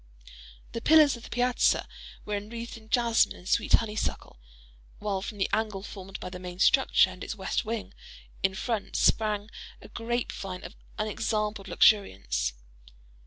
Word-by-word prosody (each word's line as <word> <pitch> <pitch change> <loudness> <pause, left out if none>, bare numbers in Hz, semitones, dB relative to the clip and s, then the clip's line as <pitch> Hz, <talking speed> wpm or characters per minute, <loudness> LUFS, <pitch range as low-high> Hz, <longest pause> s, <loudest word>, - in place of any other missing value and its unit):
The 230 - -4
pillars 305 -1 +6
of 235 - -11
the - - -11
piazza 245 0 +2 0.4
were 210 - -4
enwreathed 230 +3 -6
in 220 -1 -14
jasmine 235 -1 +3
and 180 - -13
sweet - - +1
honeysuckle; 215 - 0 0.6
while 200 -2 -2
from 210 - -6
the 190 - +1
angle 210 -3 -1
formed 195 -2 -8
by 180 - -6
the 180 - -7
main 180 -1 -7
structure 190 -2 +4
and 185 0 -9
its - - -4
west 190 -2 -2
wing, 225 0 -4 0.5
in 190 0 +1
front, 225 0 -3
sprang 215 -1 +2 0.3
a - - -13
grape 240 +1 -2
vine 185 -2 -6
of - - -9 0.2
unexampled 215 -1 -2
luxuriance. 65 - +3
210 Hz, 155 wpm, -28 LUFS, 190-230 Hz, 0.6 s, pillars